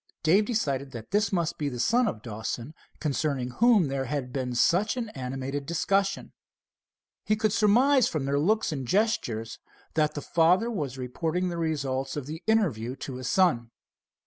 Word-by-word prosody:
Dave 190 +6 +4
decided 140 - -1
that 115 -2 -9
this 205 0 +2
must 170 -3 -1
be 145 -2 -1
the 125 -3 -6
son 235 - +3
of 110 - -4
Dawson 115 +4 -5 0.3
concerning 140 -4 -1
whom 220 - +4
there 135 0 -2
had 130 -1 -4
been 125 -2 -2
such 190 - +2
an 230 -3 -3
animated 135 0 -5
discussion. 195 +4 0 0.9
He 215 - +1
could 215 -1 0
surmise 245 +5 +4
from 155 -5 -2
their 140 +1 +1
looks 215 +7 +1
and 135 -5 -4
gestures 120 - 0 0.3
that 155 -1 +1
the 145 - -3
father 180 +8 +3
was 145 - -3
reporting 160 +8 -2
the 170 - -4
result 135 -4 -2
of 145 - -4
the 155 +4 -7
interview 140 - +1
to 135 -2 -7
his 130 -2 -4
son. 165 -12 +2
155 Hz, 170 wpm, -27 LUFS, 130-200 Hz, 0.9 s, Dave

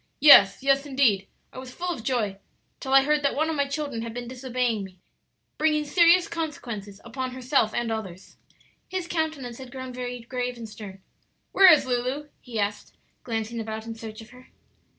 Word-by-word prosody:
"Yes, 260 -7 +8
yes 275 +1 +2
indeed; 240 -9 +2 0.3
I - - -8
was 255 -1 -10
full 355 0 -2
of 230 - -9
joy 220 -6 -1 0.4
till 265 - -6
I 270 0 +7
heard 300 +1 +2
that 280 - 0
one 315 +2 0
of - - -2
my 280 -1 0
children 280 -5 -4
had 230 0 -6
been 245 -1 -5
disobeying 250 -3 -2
me, 190 -1 -11 0.6
bringing 305 -1 +2
serious 345 +2 +5
consequences 235 -11 -6
upon 255 +2 -5
herself 255 -3 +1
and 240 -1 -1
others." 190 -5 -6 0.5
His 370 -2 -4
countenance 310 -8 -3
had 260 -2 -10
grown 260 -1 -7
very 245 -1 -5
grave 250 +1 -4
and 230 -1 -7
stern. 200 -3 -11 0.5
"Where 385 -2 +8
is 310 - +5
Lulu?" 255 +4 -2
he 235 -3 -6
asked, 205 0 -3 0.3
glancing 225 0 -3
about 220 0 -5
in 230 - -5
search 220 -1 -9
of 225 - -14
her. 250 0 -16
250 Hz, 185 wpm, -25 LUFS, 225-280 Hz, 0.6 s, Yes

